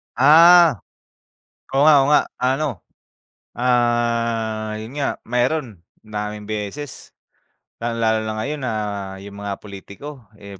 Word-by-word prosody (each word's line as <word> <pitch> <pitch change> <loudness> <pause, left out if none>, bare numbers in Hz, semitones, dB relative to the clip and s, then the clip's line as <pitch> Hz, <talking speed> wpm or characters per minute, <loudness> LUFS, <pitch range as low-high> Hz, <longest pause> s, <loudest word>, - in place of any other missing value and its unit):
Ah, 165 - +7 1.0
oo 135 - +3
nga, 155 - +7
oo - - 0
nga. 150 - +6 0.2
Ano, 135 +4 0 0.9
ah, 115 -2 0
yun 110 +2 -9
nga 140 - -1
meron, 125 - -1 0.2
madaming 105 -1 -5
beses, 110 +7 -6 0.7
lalong-lalo 115 -1 0
na 110 - -3
ngayon 145 +7 -4
na 125 -3 -2 0.5
yung 100 0 -11
mga 100 -1 -4
pulitiko, 105 +8 -11 0.2
eh, 100 -2 -12
115 Hz, 115 wpm, -21 LUFS, 110-135 Hz, 1.0 s, Ah